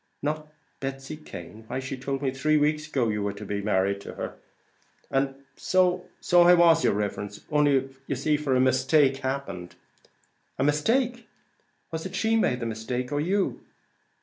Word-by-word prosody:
"Not 150 +1 -2 0.3
Betsy 135 +2 -5
Cane! 110 - -10
why 130 - -3
she 135 +1 -4
told 135 +1 -4
me 135 - +1
three 150 +4 +2
weeks 150 +1 +1
ago 130 -6 0
you 105 -1 -1
were 100 0 -1
to 105 +1 -9
be 100 +1 -2
married 100 -1 +1
to - - -9
her." - - -5 0.8
"And 135 0 -1
so 185 -1 +2 0.3
I 175 0 +8
was, 170 -1 +5
yer - - +4
riverence, 100 0 -3
only 145 -3 +3 0.2
ye 140 - -1
see 150 +4 +1
for 145 -3 0
a - - +3
mistake 130 +2 +3
as - - -12
happened." 130 -10 -4 0.8
"A 130 - +1
mistake! 230 - +1 0.6
Was 160 +2 -3
it 190 - -9
she 220 +3 +2
made 125 - +1
the - - -2
mistake 115 +3 -3
or 145 0 0
you?" 190 +5 0
135 Hz, 175 wpm, -26 LUFS, 125-155 Hz, 0.8 s, I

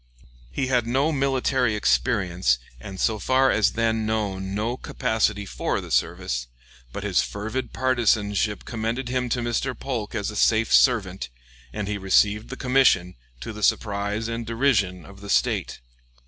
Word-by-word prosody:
He 135 - -1
had 125 -3 +1
no 135 +6 +1
military 135 -4 +1
experience, 90 - +1 0.2
and 95 +8 -9
so 110 +2 +1
far 130 +4 +3
as 110 - +2
then 115 -1 0
known 100 -3 -2
no 110 +4 -1
capacity 110 -4 -1
for - - -2
the - - -9
service; - - -1 0.4
but - - -6
his - - +2
fervid 110 +4 -4
partisanship 110 -5 +1
commended 115 +3 -3
him 125 -1 -1
to 120 +1 0
Mr. 120 +1 -2
Polk 120 -5 -4
as 105 -1 -2
a - - -9
safe 110 +1 +2
servant, 95 - +3 0.4
and 105 -2 -4
he 105 0 -3
received 105 +2 +2
the - - -6
commission, 125 -9 +3 0.3
to 115 - -6
the 105 - -9
surprise 105 +2 0
and 115 -1 -4
derision 110 - +1
of 100 0 -14
the 100 - -9
State. - - 0
110 Hz, 155 wpm, -24 LUFS, 100-125 Hz, 0.4 s, far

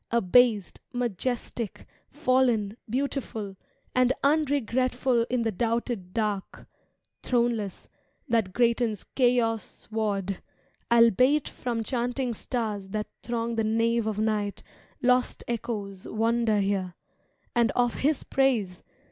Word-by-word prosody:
Abased, 230 -1 +3
majestic, 240 -1 -3 0.2
fallen, 255 -7 +2
beautiful. 240 -6 -3 0.4
And 255 0 +4
unregretful 260 -4 +2
in 250 -2 +1
the 225 - 0
doubted 230 -2 -2
dark, 210 -2 -2 0.6
Throneless, 235 -5 0 0.4
that 225 -6 +1
greatens 235 -2 +1
Chaos^ward, 220 -5 0 0.5
albeit 245 +5 +5
From 235 -2 -3
chanting 245 +1 -1
stars 215 -4 -3
that 210 +1 -3
throng 235 -1 -2
the 225 - +2
nave 230 +1 +1
of 215 -2 -2
night, 210 -2 -1 0.4
Lost 250 0 +2
echoes 205 -5 -4
wander 225 0 +1
here, 195 -3 -1 0.6
and 235 -1 +4
of 245 -1 +2
His 295 0 +1
praise. 230 -10 +1
230 Hz, 100 wpm, -27 LUFS, 210-245 Hz, 0.6 s, albeit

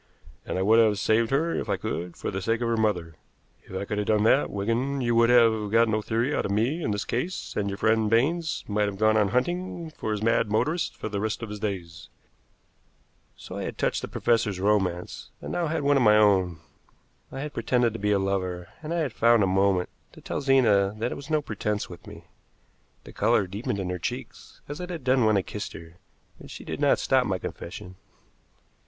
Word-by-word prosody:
And - - -2
I 95 - 0
would 110 +3 +5
have 110 -3 +4
saved 110 +2 +2
her 160 +5 +1
if - - -3
I - - +1
could, 85 +1 -5
for - - -4
the 95 0 -3
sake 115 +3 0
of 120 - 0
her 115 - +1
mother. 90 -8 -1 0.5
If 95 - -10
I - - -4
could 105 +1 -3
have 105 - -2
done 105 -1 +3
that, 130 +5 +3
Wigan, 115 +7 -1
you 120 -1 +1
would 115 0 +4
have 115 -3 +4
got 115 +1 +4
no 110 -1 0
theory 115 +6 -1
out - - 0
of - - -4
me 120 +11 0
in 130 - -1
this 105 -1 -2
case, 165 +10 -3
and 100 -1 -1
your 100 - -4
friend 110 0 +2
Baines 155 +9 +1
might 105 0 +1
have 100 -1 -5
gone 110 +1 +3
on 105 -2 +3
hunting 175 - -2
for 110 - -4
his 105 0 -2
mad 115 -1 +2
motorist 155 +11 0
for - - -5
the 105 -2 -3
rest 110 +2 -2
of 115 - -5
his 105 - -6
days." 85 -6 -5 1.3
So - - -9
I - - -4
had - - -6
touched - - 0
the - - -5
professor's 115 -5 0
romance, 95 -3 -1
and - - -7
now 170 -1 -1
had 155 -1 -2
one 145 0 +4
of - - +3
my 105 -2 +6
own. 95 -5 +3 0.7
I 135 - -5
had 150 0 -5
pretended 120 -3 +1
to 115 - -6
be 105 +1 0
a 100 - +4
lover, 95 -2 -2
and 155 0 -6
I 170 - 0
had 140 -7 -2
found 115 -1 +4
a - - +4
moment 95 -1 +2 0.2
to - - -14
tell - - -4
Zena 110 -8 +3
that 115 +3 -2
it - - -3
was 140 - -10
no 155 -1 +1
pretense 105 -4 -3
with 85 - -12
me. - - -11 0.8
The - - -12
color 100 - +2
deepened 100 +2 -4
in 90 -2 -3
her 90 - -4
cheeks - - -7
as 145 +1 -6
it 180 - -6
had 170 -6 -6
done 130 -1 +3
when 110 -1 +4
I 95 - +1
kissed 105 +2 -6
her, 80 +1 -12 0.4
but - - -12
she - - -9
did - - -5
not - - +4
stop 130 -2 +2
my 95 -2 0
confession. 90 +1 -8
110 Hz, 230 wpm, -26 LUFS, 100-125 Hz, 1.3 s, my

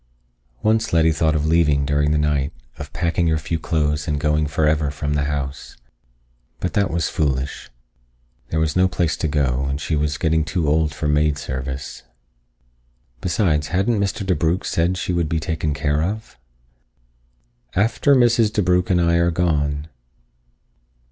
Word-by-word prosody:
Once 110 +1 +2
Letty 80 -1 +4
thought 80 0 +1
of 75 0 0
leaving 75 -3 +3
during 75 +1 +1
the 75 - +2
night, 75 -1 0 0.3
of - - -7
packing 85 0 0
her 80 -1 +2
few 80 +1 -3
clothes 75 -2 -1
and 75 -1 -1
going 75 +1 +1
for 75 +1 +1
ever 75 -1 +1
from 75 0 -3
the 70 -1 0
house. 70 -1 -4 0.8
But 90 - -3
that 100 -3 +1
was 80 -1 -1
foolish. 70 -4 -2 0.8
There 80 - -1
was 80 -1 0
no 90 +1 +4
place 85 -4 0
to - - -1
go, 70 -3 0
and 70 +1 -2
she 80 - -2
was 75 0 -1
getting 80 -1 +1
too 80 0 -2
old 75 +1 +2
for 75 +1 -3
maid 75 0 +2
service. 65 -1 -5 1.2
Besides, 85 -5 +1
hadn't 100 +7 +1
Mr. 100 +1 -2
DeBrugh 85 0 0
said 85 +2 0
she 90 - -2
would 85 -3 0
be 80 - 0
taken 80 -1 -2
care 75 +1 0
of. 105 +6 -4 1.4
"After 115 +8 +3
_Mrs. 120 -3 +4
DeBrugh+ 90 -4 +1
and 90 -2 +3
I 85 0 +3
are 85 0 +3
gone." 75 -4 0
80 Hz, 160 wpm, -21 LUFS, 75-85 Hz, 1.4 s, Letty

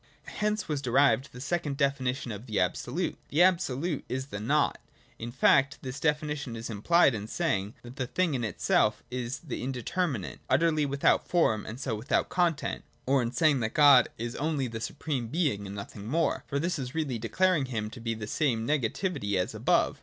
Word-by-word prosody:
(i) - - -8
Hence 210 0 -1
was 150 -3 -2
derived 135 +1 +3
the 125 - -10
second 145 0 -2
definition 135 -3 0
of 105 +4 -8
the 110 - -1
Absolute; 125 - -1
the 160 +5 +4
Absolute 170 -4 +1
is 130 +1 -2
the 100 -7 -6
Nought. 145 +7 +1 0.4
In 115 +1 -5
fact 135 +2 +3
this 130 +1 -5
definition 150 -4 -1
is 115 +1 -6
implied 140 +8 +4
in 105 -1 -4
saying 110 - -1
that 120 +3 -11
the 130 -3 -2
thing 180 +2 0
in 125 -3 -1
itself 105 0 +1
is 125 0 -4
the 155 -7 -5
indeterminate, 130 - -2
utterly 155 -3 +3
without 140 0 +2
form 110 -12 +2
and 115 +3 -7
so 135 -4 -2
without 110 +7 0
content, 170 -5 0
— - - -37
or 135 0 +3
in 115 -1 -2
saying 150 -1 +3
that 110 -1 -3
God 140 -4 +7
is 120 +1 -4
only 150 -2 0
the 115 -1 -6
supreme 135 -2 -3
Being 130 - -1
and 100 - -7
nothing 100 +1 -8
more; 165 +6 0
for 140 - -2
this 170 +2 -1
is 130 +1 -5
really 140 -7 -1
declaring 165 +6 +2
him 110 -4 -4
to 120 - -10
be 115 0 -2
the 110 -1 -6
same 115 -1 0
negativity 140 - -1
as 90 -1 0
above. - - +1
135 Hz, 195 wpm, -28 LUFS, 115-155 Hz, 0.4 s, God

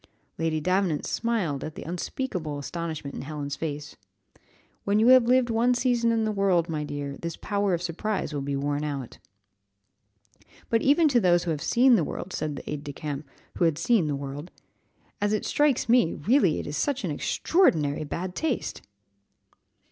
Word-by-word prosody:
Lady 165 -1 0
Davenant 180 -1 0
smiled 195 - -1
at 155 - -6
the - - -7
unspeakable 175 - -4
astonishment 155 -1 -5
in - - -5
Helen's 145 0 -5
face. 150 -1 -5 0.9
"When 200 +1 +1
you 225 +3 +5
have 255 -2 +7
lived 250 -1 +3
one 240 +2 +3
season 240 -2 +2
in 225 -1 +1
the 215 - 0
world, 195 -5 +2
my 155 -2 -2
dear 145 -1 -4
child, 140 - -9
this 170 0 -4
power 200 -2 0
of 170 - -5
surprise 180 +1 -2
will 145 - -2
be 140 0 -2
worn 145 +1 -1
out." 140 -5 -5 1.5
"But 230 -1 +3
even 295 +4 +4
to 250 -3 +4
those 175 -4 +3
who 170 - -1
have 150 -2 -3
seen 240 +8 +5
the 170 - +1
world," 180 +4 -5
said 150 -2 -2
the - - -9
aide 150 -1 -4
de 145 -1 -6
camp, 150 -1 -5 0.3
who 175 - +4
had 160 -3 +2
seen 175 0 +2
the 145 - -1
world, 140 +4 -6 0.7
"as 205 +1 +1
it 215 - -1
strikes 290 -6 +2
me, 235 -8 +4
really 190 - +2
it - - -5
is 145 - -5
such 270 - -1
extraordinary 155 - +1
bad 180 +5 -4
taste!" 305 +3 -2
170 Hz, 180 wpm, -26 LUFS, 150-230 Hz, 1.5 s, have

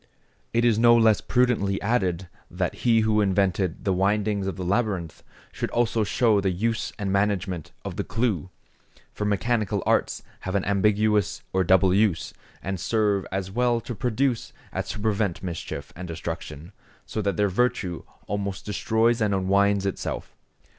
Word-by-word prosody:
It 115 +1 +2
is 115 -2 +3
no 120 0 +6
less 110 -5 +4
prudently 115 -6 +1
added, 95 -5 0 0.2
that - - -2
he 115 -2 +4
who 110 -1 +2
invented 95 -3 0
the 95 - +2
windings 100 +1 +1
of 95 - -2
the 90 - -5
labyrinth, 95 -4 -1 0.3
should - - -3
also 115 -2 +1
show 105 +3 +2
the 95 - +1
use 110 +5 -1
and 100 -3 -2
management 95 -4 -1
of - - -5
the - - -1
clue; 110 -7 -1 0.6
for 105 - -3
mechanical 105 +1 0
arts - - +1 0.2
have 95 +1 -4
an 100 - +1
ambiguous 105 +1 +2
or 95 0 +3
double 95 +1 +4
use, 100 -4 +1 0.3
and 95 0 -3
serve 100 -1 +1
as 95 0 -3
well 120 +2 +2
to 120 - -6
produce 125 +1 -1 0.2
as - - -3
to - - -4
prevent 105 -4 -1
mischief 80 -5 -5
and 90 +2 -7
destruction; 85 0 -6 0.3
so 110 - -3
that 100 -1 -1
their 105 -1 +3
virtue 100 -5 0 0.2
almost 100 -1 -3
destroys 115 +3 +1
or - - +4
unwinds 100 0 +2
itself. 100 - -4
100 Hz, 160 wpm, -25 LUFS, 95-110 Hz, 0.6 s, no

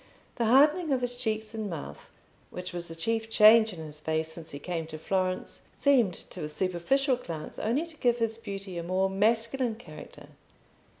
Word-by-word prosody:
The 235 - +1
hardening 295 +7 +4
of 260 -2 +2
his 245 0 -2
cheeks 220 -3 -2
and 215 -2 -4
mouth, 145 - -8 0.4
which 180 0 -6
was 175 -1 -2
the 165 - -7
chief 225 +6 -1
change 220 0 +7
in 180 - -9
his 150 0 -10
face 160 +1 -2
since 160 -1 -9
he 140 - -6
came 165 +1 -4
to 155 - -7
Florence, 185 +2 -2
seemed 245 -11 +3 0.2
to 175 - -6
a 150 - -3
superficial 190 - +1
glance 165 -10 -7
only 250 +9 0
to 325 -2 -14
give 240 -3 +2
his 230 -1 -1
beauty 195 -4 -6
a - - -4
more 190 +2 0
masculine 230 +4 +1
character. 155 -9 -12
210 Hz, 185 wpm, -28 LUFS, 170-235 Hz, 0.4 s, change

